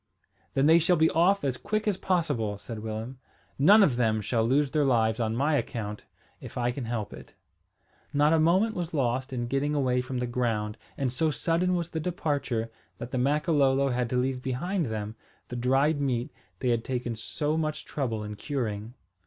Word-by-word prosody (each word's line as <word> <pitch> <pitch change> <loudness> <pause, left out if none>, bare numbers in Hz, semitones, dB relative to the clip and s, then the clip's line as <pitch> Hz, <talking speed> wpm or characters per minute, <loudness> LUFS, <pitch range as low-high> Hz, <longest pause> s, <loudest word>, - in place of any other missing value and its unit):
"Then 135 - +3
they 165 +2 +7
shall 175 +2 +3
be 160 0 +3
off 185 +5 +3
as 130 -3 -1
quick 215 - -2
as 205 - +2
possible," 145 - 0
said 110 +2 -7
Willem. 110 +4 -5 0.4
"None 205 +9 +7
of 135 -10 +2
them 110 -3 +2
shall 110 +2 0
lose 135 +4 +2
their 150 -2 +2
lives 115 -4 +2
on 110 -1 0
my 145 +5 +1
account, 105 -7 -3 0.3
if - - -9
I 120 0 +1
can 125 0 -5
help 115 -3 -3
it." - - -12 0.8
Not 145 +2 +3
a 165 - +4
moment 185 +8 +3
was 175 -4 -4
lost 130 0 0
in 120 -2 -2
getting 135 +4 0
away 125 -3 +2
from 130 0 -5
the 125 - -1
ground 115 -3 -1 0.2
and 130 -3 -1
so 160 +4 +1
sudden 170 +4 +1
was 170 -1 -2
the 160 - -3
departure 145 - -2 0.3
that 120 +1 -7
the 130 - -1
Makololo 140 -1 +2
had 125 -1 -1
to 125 - 0
leave 125 0 0
behind 155 +7 -1
them 110 0 -4 0.3
the 125 - -5
dried 135 +5 +2
meat 125 -3 -1 0.3
they 130 - +1
had 115 -1 +1
taken 125 -2 -2
so 150 +7 -2
much 155 -1 -2
trouble 115 -7 -2
in 105 0 -6
curing. 115 -3 -4
130 Hz, 195 wpm, -28 LUFS, 120-155 Hz, 0.8 s, they